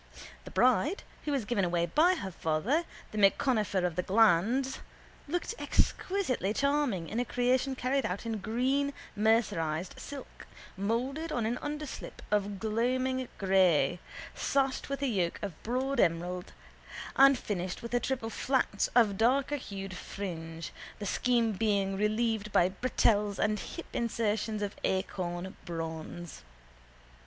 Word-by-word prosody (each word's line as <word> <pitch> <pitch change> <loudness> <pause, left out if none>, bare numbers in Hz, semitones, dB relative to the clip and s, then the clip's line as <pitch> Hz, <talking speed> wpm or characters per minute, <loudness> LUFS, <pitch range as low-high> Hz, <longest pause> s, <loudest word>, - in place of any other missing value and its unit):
The - - -7
bride 255 - +2 0.2
who 300 - -1
was 270 -6 0
given 210 -3 +1
away 175 -1 +1
by 325 - +4
her 195 - -5
father, 190 - 0 0.3
the 215 - -3
M'Conifer 205 -2 +3
of 175 -2 -1
the 180 - +1
Glands, 225 +7 +3 0.5
looked 350 +8 -2
exquisitely 260 - 0
charming 280 - +1
in 225 - -2
a - - +2
creation 250 +2 +1
carried 260 +2 0
out 185 +5 -3
in 225 -2 -2
green 260 +7 0 0.2
mercerised 195 -7 +1
silk, 285 -2 -9 0.3
moulded 250 +11 -1
on 235 - 0
an 235 +3 -1
underslip 295 -1 -6
of 205 -1 +1
gloaming 255 +4 0
grey, 180 -5 +3 0.3
sashed 270 -1 0
with 275 0 -3
a - - +2
yoke 185 -8 0
of 195 -6 -5
broad 260 +3 -1
emerald 175 +1 +1 0.6
and 275 0 +7
finished 185 -4 -4
with 235 - -6
a 245 - +4
triple 245 -3 -2
flounce 255 -5 +1
of 215 -5 +4
darkerhued 240 -6 0
fringe, 165 -4 -6 0.2
the 205 - -5
scheme 235 +2 +2
being 200 -2 +1
relieved 215 +1 0
by 175 -1 +4
bretelles 210 -1 +1
and 210 -1 +1
hip 335 - -7
insertions 220 -2 -1
of 205 - -3
acorn 185 -1 -2
bronze. 165 0 -6
220 Hz, 135 wpm, -31 LUFS, 190-260 Hz, 0.6 s, and